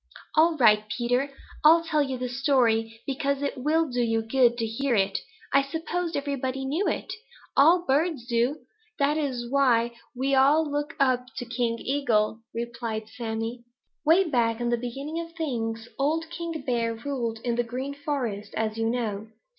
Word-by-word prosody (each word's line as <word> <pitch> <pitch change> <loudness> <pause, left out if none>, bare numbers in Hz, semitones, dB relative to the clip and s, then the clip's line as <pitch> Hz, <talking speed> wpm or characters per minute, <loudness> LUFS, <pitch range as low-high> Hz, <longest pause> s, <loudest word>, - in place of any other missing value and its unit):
"All 320 +1 +4
right, 215 -4 +4
Peter. 245 +4 0 0.3
I'll 330 +2 +7
tell 310 -2 +1
you 265 -2 -1
the 250 0 -3
story, 235 -4 +1
because 280 +1 -1
it 280 - -1
will 310 +5 +1
do 245 -2 -1
you 225 -1 +1
good 240 +1 +3
to 230 - 0
hear 240 +3 0
it. 195 -1 +1 0.3
I 275 - +6
supposed 325 +4 -3
everybody 270 -2 -2
knew 315 +9 0
it. - - -2 0.4
All 340 +5 +5
birds 290 -2 +1
do. 245 +4 0 0.4
That 290 +1 +2
is 260 -6 -2
why 240 -3 +3 0.2
we 270 +2 0
all 285 +4 +5
look 290 0 -3
up 255 -2 +2
to 245 - -3
King 235 -1 -1
Eagle," 230 -6 +1
replied 230 -2 -4
Sammy. 230 +1 -4 0.4
"Way 330 +5 +5
back 240 -8 +1
in 240 0 -1
the 240 - +3
beginning 270 +7 -5
of 335 0 -7
things, 230 -8 -3
old 320 +4 0
King 335 -3 -5
Bear 230 -2 0
ruled 235 -2 -3
in 240 - 0
the 240 +1 +1
Green 255 +4 -4
Forest, 255 -8 -3
as 220 0 -1
you 225 0 +1
know. 220 -3 -2
255 Hz, 170 wpm, -26 LUFS, 230-285 Hz, 0.4 s, I'll